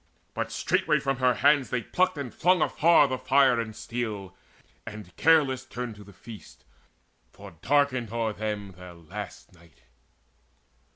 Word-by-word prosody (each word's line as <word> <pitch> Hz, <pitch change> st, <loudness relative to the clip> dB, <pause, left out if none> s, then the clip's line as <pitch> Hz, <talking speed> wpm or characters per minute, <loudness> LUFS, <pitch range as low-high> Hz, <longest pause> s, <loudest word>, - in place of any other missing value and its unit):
But -, -, -3 dB
straightway -, -, +1 dB
from 135 Hz, -1 st, -2 dB
her 125 Hz, -1 st, +2 dB
hands 145 Hz, 0 st, +3 dB
they 120 Hz, -2 st, -2 dB
plucked 185 Hz, -, 0 dB
and 135 Hz, -4 st, -6 dB
flung 180 Hz, +2 st, +3 dB
Afar 165 Hz, -2 st, +4 dB
the 130 Hz, -1 st, -3 dB
fire 130 Hz, -1 st, +3 dB
and 110 Hz, -2 st, -5 dB
steel, 105 Hz, -6 st, -5 dB, 0.5 s
and 105 Hz, -5 st, -10 dB
careless 145 Hz, -5 st, +3 dB
turned 125 Hz, -3 st, -6 dB
To 105 Hz, -, -12 dB
the 100 Hz, -, -15 dB
feast; 95 Hz, -, -13 dB, 0.7 s
for -, -, -12 dB
darkened 130 Hz, -5 st, +1 dB
o'er 115 Hz, -2 st, -1 dB
them 105 Hz, -2 st, -4 dB
their 90 Hz, -1 st, -12 dB
last 85 Hz, +1 st, -9 dB
night. 85 Hz, -7 st, -22 dB
120 Hz, 150 wpm, -26 LUFS, 105-135 Hz, 0.7 s, Afar